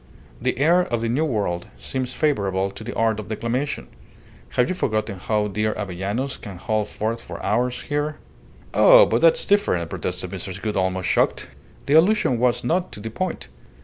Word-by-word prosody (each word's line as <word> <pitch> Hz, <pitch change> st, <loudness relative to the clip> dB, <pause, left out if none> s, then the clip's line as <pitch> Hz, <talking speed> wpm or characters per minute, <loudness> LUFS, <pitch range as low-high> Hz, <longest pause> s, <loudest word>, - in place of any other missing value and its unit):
The -, -, 0 dB
air 165 Hz, +6 st, +4 dB
of 120 Hz, -9 st, -2 dB
the 115 Hz, -, -1 dB
New 140 Hz, +7 st, +1 dB
World 100 Hz, -, -2 dB
seems 130 Hz, -, -3 dB
favourable 100 Hz, -10 st, 0 dB
to 110 Hz, -, -10 dB
the 120 Hz, -, -6 dB
art 110 Hz, -1 st, +1 dB
of 105 Hz, -, -7 dB
declamation. 115 Hz, +6 st, -2 dB, 0.7 s
Have 125 Hz, -, +3 dB
you -, -, -1 dB
forgotten 110 Hz, -, -2 dB
how 105 Hz, +2 st, 0 dB
dear 105 Hz, +2 st, -1 dB
Avellanos 100 Hz, +7 st, -3 dB
can 100 Hz, -5 st, -9 dB
hold 105 Hz, +3 st, -1 dB
forth 115 Hz, +2 st, -3 dB
for -, -, -8 dB
hours 120 Hz, +5 st, 0 dB
here 145 Hz, +1 st, -2 dB, 0.3 s
?" -, -, -25 dB
"Oh, -, -, +8 dB
but -, -, +1 dB
that's -, -, +4 dB
different," 90 Hz, -, +1 dB
protested 90 Hz, 0 st, -4 dB
Mrs. 95 Hz, 0 st, -5 dB
Gould, 105 Hz, 0 st, -3 dB
almost 95 Hz, -1 st, 0 dB
shocked. -, -, +1 dB, 0.4 s
The 140 Hz, -, +1 dB
allusion 160 Hz, -, +4 dB
was 125 Hz, 0 st, +2 dB
not 175 Hz, +8 st, 0 dB
to -, -, -8 dB
the 110 Hz, +2 st, -6 dB
point. 185 Hz, +8 st, -4 dB
115 Hz, 180 wpm, -23 LUFS, 100-145 Hz, 0.7 s, Oh